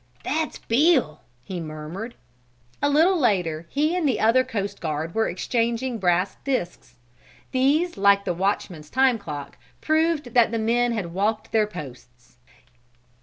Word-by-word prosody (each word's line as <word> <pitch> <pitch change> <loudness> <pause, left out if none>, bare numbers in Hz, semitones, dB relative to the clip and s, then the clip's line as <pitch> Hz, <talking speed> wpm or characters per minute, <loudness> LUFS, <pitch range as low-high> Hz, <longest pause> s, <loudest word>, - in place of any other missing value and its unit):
"That's 310 +2 -2
Bill!" 255 - +2 0.2
he 180 +6 -5
murmured. 160 +8 -7 0.7
A 285 - +2
little 330 +5 +4
later 175 - 0
he 305 +4 +1
and 335 -6 +1
the 240 - 0
other 230 +4 +4
coast 200 -4 -4
guard 160 0 -3
were 225 0 +1
exchanging 235 +5 -1
brass 180 0 +1
disks. 175 - -3 0.6
These, 290 +7 +2
like 200 0 +4
the 180 - 0
watchman's 175 -4 -2
time 260 -2 +3
clock, 145 -9 -7 0.2
proved 315 -5 0
that 235 -3 +5
the 230 - -1
men 235 +2 +1
had 185 -7 -4
walked 210 +4 -1
their 215 -1 +2
posts. 125 -8 -11
220 Hz, 140 wpm, -24 LUFS, 175-260 Hz, 0.7 s, that